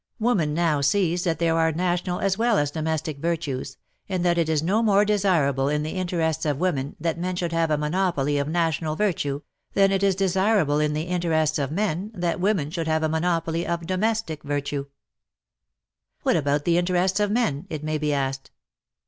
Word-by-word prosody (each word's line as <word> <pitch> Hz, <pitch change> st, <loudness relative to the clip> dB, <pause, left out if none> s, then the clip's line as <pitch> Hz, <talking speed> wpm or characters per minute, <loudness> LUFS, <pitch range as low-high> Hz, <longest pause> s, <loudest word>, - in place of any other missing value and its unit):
Woman 195 Hz, -10 st, +1 dB
now 160 Hz, -4 st, +1 dB
sees 175 Hz, +4 st, +1 dB
that 165 Hz, -2 st, +1 dB
there 165 Hz, 0 st, +1 dB
are 160 Hz, 0 st, +3 dB
national 180 Hz, +1 st, -1 dB
as 195 Hz, -1 st, +1 dB
well 230 Hz, 0 st, +2 dB
as 145 Hz, -1 st, +1 dB
domestic 155 Hz, -1 st, -2 dB
virtues, 155 Hz, -5 st, -3 dB, 0.3 s
and 185 Hz, -2 st, -1 dB
that 175 Hz, -1 st, +3 dB
it 165 Hz, -1 st, +1 dB
is 155 Hz, -1 st, +1 dB
no 200 Hz, +7 st, +2 dB
more 205 Hz, -2 st, +4 dB
desirable 165 Hz, -10 st, +2 dB
in 150 Hz, 0 st, 0 dB
the 155 Hz, -, -3 dB
interests 170 Hz, -4 st, -1 dB
of 145 Hz, -3 st, 0 dB
women 145 Hz, -5 st, -1 dB
that 165 Hz, 0 st, -2 dB
men 180 Hz, +1 st, -2 dB
should 175 Hz, -1 st, -2 dB
have 165 Hz, -1 st, +1 dB
a 150 Hz, -, +2 dB
monopoly 150 Hz, -3 st, 0 dB
of 140 Hz, -, -1 dB
national 160 Hz, -1 st, 0 dB
virtue, 150 Hz, -8 st, -1 dB, 0.3 s
than 195 Hz, -1 st, +4 dB
it 195 Hz, 0 st, +1 dB
is 195 Hz, -1 st, +3 dB
desirable 190 Hz, -5 st, +2 dB
in 150 Hz, 0 st, +1 dB
the 155 Hz, +1 st, -1 dB
interests 165 Hz, -3 st, 0 dB
of 140 Hz, -2 st, -1 dB
men 195 Hz, +1 st, -1 dB
that 175 Hz, -1 st, -1 dB
women 180 Hz, -6 st, 0 dB
should 165 Hz, -1 st, -3 dB
have 160 Hz, 0 st, +1 dB
a 155 Hz, -, +1 dB
monopoly 165 Hz, 0 st, 0 dB
of 170 Hz, -1 st, -2 dB
domestic 190 Hz, -3 st, -1 dB
virtue. 145 Hz, -1 st, -3 dB, 1.3 s
But -, -, -40 dB
what -, -, +3 dB
about 145 Hz, -1 st, 0 dB
the 170 Hz, 0 st, +3 dB
interests 180 Hz, +2 st, +1 dB
of 205 Hz, -1 st, +2 dB
men, 190 Hz, -, 0 dB
it 155 Hz, -2 st, -5 dB
may 155 Hz, 0 st, -1 dB
be 150 Hz, 0 st, 0 dB
asked 135 Hz, -1 st, -2 dB
165 Hz, 195 wpm, -24 LUFS, 150-185 Hz, 1.3 s, more